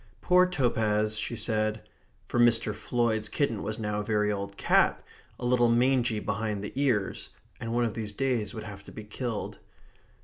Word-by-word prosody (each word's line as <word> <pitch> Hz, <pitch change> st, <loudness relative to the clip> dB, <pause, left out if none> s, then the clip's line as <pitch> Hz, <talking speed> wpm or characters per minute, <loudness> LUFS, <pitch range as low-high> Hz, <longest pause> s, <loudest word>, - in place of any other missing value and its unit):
"Poor 180 Hz, 0 st, +4 dB
Topaz," 110 Hz, -9 st, +1 dB
she 110 Hz, +2 st, -2 dB
said 110 Hz, -1 st, -1 dB, 0.4 s
(for 120 Hz, -, -1 dB
Mr. 115 Hz, -2 st, +4 dB
Floyd's 110 Hz, -1 st, 0 dB
kitten 115 Hz, -8 st, 0 dB
was 105 Hz, +1 st, -3 dB
now 105 Hz, -1 st, -2 dB
a -, -, -2 dB
very 105 Hz, -1 st, +1 dB
old 100 Hz, -1 st, -4 dB
cat, -, -, +3 dB, 0.4 s
a 125 Hz, -, -4 dB
little 120 Hz, -1 st, +3 dB
mangy 120 Hz, -2 st, +2 dB
behind 105 Hz, -1 st, -2 dB
the 105 Hz, -, -6 dB
ears, 125 Hz, -8 st, 0 dB, 0.3 s
and 115 Hz, -, -4 dB
one 120 Hz, +1 st, +2 dB
of 110 Hz, -, -2 dB
these 110 Hz, -2 st, -4 dB
days 120 Hz, -3 st, -1 dB
would 110 Hz, -, -5 dB
have 100 Hz, -2 st, -9 dB
to -, -, -11 dB
be 110 Hz, -, -8 dB
killed). 110 Hz, +1 st, -5 dB
110 Hz, 175 wpm, -28 LUFS, 105-120 Hz, 0.4 s, Poor